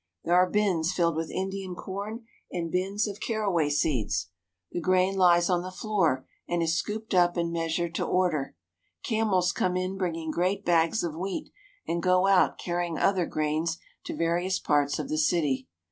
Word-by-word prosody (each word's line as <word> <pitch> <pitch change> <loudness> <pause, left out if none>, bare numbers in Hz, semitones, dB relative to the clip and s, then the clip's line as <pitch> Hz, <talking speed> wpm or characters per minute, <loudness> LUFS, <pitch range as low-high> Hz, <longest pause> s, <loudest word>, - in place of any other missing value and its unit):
There 170 - 0
are 180 +1 +5
bins 185 -6 +1
filled 170 -3 +1
with 160 0 -2
Indian 190 -1 -4
corn 205 +6 -6 0.3
and 170 -2 -3
bins 195 +4 0
of 205 0 -6
caraway 200 -10 0
seeds. 115 - 0 0.4
The 175 - -3
grain 185 +2 +2
lies 175 -2 +5
on 180 -2 +2
the 185 - -6
floor 185 - 0 0.2
and 175 -1 +1
is 165 0 +1
scooped 215 +5 -3
up 175 -1 +4
and 170 0 -1
measured 165 0 -1
to - - -1
order. 175 -7 0 0.5
Camels 210 -6 +1
come 180 0 0
in 185 +1 -2
bringing 165 -3 -2
great 185 +5 0
bags 170 +4 +3
of 170 -3 -2
wheat 185 +3 -4 0.4
and 170 +1 -1
go 185 +1 +3
out 195 -1 +4
carrying 175 -2 -2
other 185 -3 +2
grains 155 +2 -1 0.3
to - - -4
various 175 +3 0
parts 145 -1 +1
of - - -4
the 155 - -1
city. 150 -5 +1
175 Hz, 175 wpm, -27 LUFS, 165-190 Hz, 0.5 s, are